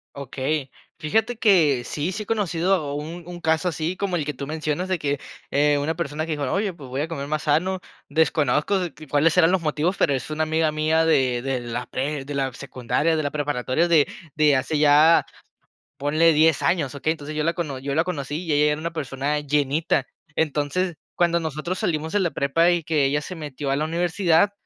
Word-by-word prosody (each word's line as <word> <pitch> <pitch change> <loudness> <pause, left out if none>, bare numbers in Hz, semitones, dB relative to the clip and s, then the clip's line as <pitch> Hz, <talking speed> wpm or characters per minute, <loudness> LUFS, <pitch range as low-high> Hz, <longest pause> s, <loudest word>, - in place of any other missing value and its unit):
Okey. 140 +1 -3 0.3
Fíjate 220 +9 0
que 165 - +4
si 155 +8 -2
sí 215 +3 -4
he - - -16
conocido 180 -7 0
un 160 +4 -6
un 175 -1 -7
caso 160 +3 +1
así 160 +2 -3
como 190 -1 -2
el 155 -4 -1
que 150 - -3
tú 140 +1 -7
mencionas, 155 +3 -2
de 185 - +1
que, 145 -2 -1 0.3
eh, 145 +1 +3
una 150 +3 -1
persona 155 -1 -3
que 165 - -5
dijo: 145 -4 -2
"Oye, 200 -1 0
pues, 140 -6 -11
voy 130 +3 -2
a 155 - -1
comer 140 -4 -5
más 155 +1 -2
sano". 175 +6 +1 0.3
Desconozco 155 +3 +2 0.3
cuáles 155 +4 +3
eran 165 -1 +6
los 190 -1 +2
motivos, 160 +4 0
pero 145 - +2
es 130 - -5
una 155 +1 0
amiga 155 0 +1
mía 155 +1 +2
de 130 -6 +2
de 135 -1 -1
la 120 +1 -4
pre 140 +1 -3
de 145 - -6
la 135 -1 -1
secundaria, 140 +5 -1
de 155 - 0
la 145 - 0
preparatoria, 145 +2 0
de 160 -4 +4 0.3
de 150 -2 +4
hace 140 +4 0
ya, 150 +2 +6 0.7
ponle 155 +4 +3
10 155 -1 +3
años, 145 -2 0
¿okey? 150 +3 0
Entonces 155 -1 -6
yo 155 - 0
la 165 +2 +1
cono 155 -7 -4
yo 140 +2 -4
la 160 +3 +2
conocí, 155 -2 -4
y 165 - -3
ella 150 +1 +4
era 150 +1 -3
una 170 +1 -3
persona 145 -1 -2
llenita. 145 +2 0 0.3
Entonces, 160 +4 0 0.2
cuando 170 -1 +2
nosotros 160 +3 -3
salimos 160 -1 -2
de 205 - +3
la 175 -4 0
prepa 165 +5 +2
y 175 -1 0
que 150 -2 +1
ella 145 +2 +1
se 185 - -7
metió 145 -3 -5
a 135 - +2
la 150 +2 0
universidad, 170 +2 +2
155 Hz, 210 wpm, -23 LUFS, 145-170 Hz, 0.7 s, eran